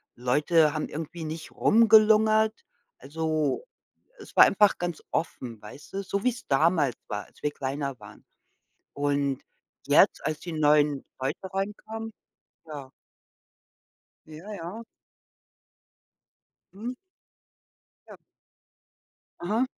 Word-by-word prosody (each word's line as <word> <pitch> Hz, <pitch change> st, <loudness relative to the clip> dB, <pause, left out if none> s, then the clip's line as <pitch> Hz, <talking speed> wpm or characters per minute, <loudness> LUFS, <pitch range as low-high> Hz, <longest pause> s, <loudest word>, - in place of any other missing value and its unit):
Leute 150 Hz, +5 st, +3 dB
haben 155 Hz, -, -2 dB
irgendwie 160 Hz, +2 st, -6 dB
nicht 155 Hz, 0 st, -6 dB
rumgelungert. 220 Hz, 0 st, +5 dB, 0.4 s
Also, 155 Hz, -, -1 dB, 0.5 s
es -, -, -13 dB
war -, -, +10 dB
einfach 205 Hz, 0 st, +4 dB
ganz 175 Hz, -2 st, -3 dB
offen, 120 Hz, -8 st, -3 dB
weißt 135 Hz, -, -12 dB
du? 195 Hz, 0 st, -3 dB
So 200 Hz, +1 st, -3 dB
wie's 245 Hz, -1 st, -1 dB
damals 145 Hz, -3 st, +2 dB
war, 105 Hz, -1 st, -4 dB
als -, -, -23 dB
wir 150 Hz, -, +1 dB
kleiner 140 Hz, -1 st, -4 dB
waren. -, -, -14 dB, 0.7 s
Und 140 Hz, -1 st, 0 dB, 0.5 s
jetzt, -, -, +4 dB
als 155 Hz, -, -1 dB
die 170 Hz, -2 st, -7 dB
neuen 150 Hz, -2 st, +3 dB, 0.2 s
Leute 135 Hz, +1 st, -2 dB
reinkamen 220 Hz, +3 st, -4 dB, 0.6 s
ja. 140 Hz, -4 st, -8 dB, 1.4 s
Ja, 160 Hz, +7 st, -10 dB
ja. 200 Hz, +5 st, -7 dB, 1.9 s
Mhm. 235 Hz, +5 st, -5 dB, 1.1 s
Ja. -, -, -11 dB, 1.2 s
Aha. 215 Hz, +9 st, 0 dB
160 Hz, 105 wpm, -27 LUFS, 145-210 Hz, 1.9 s, war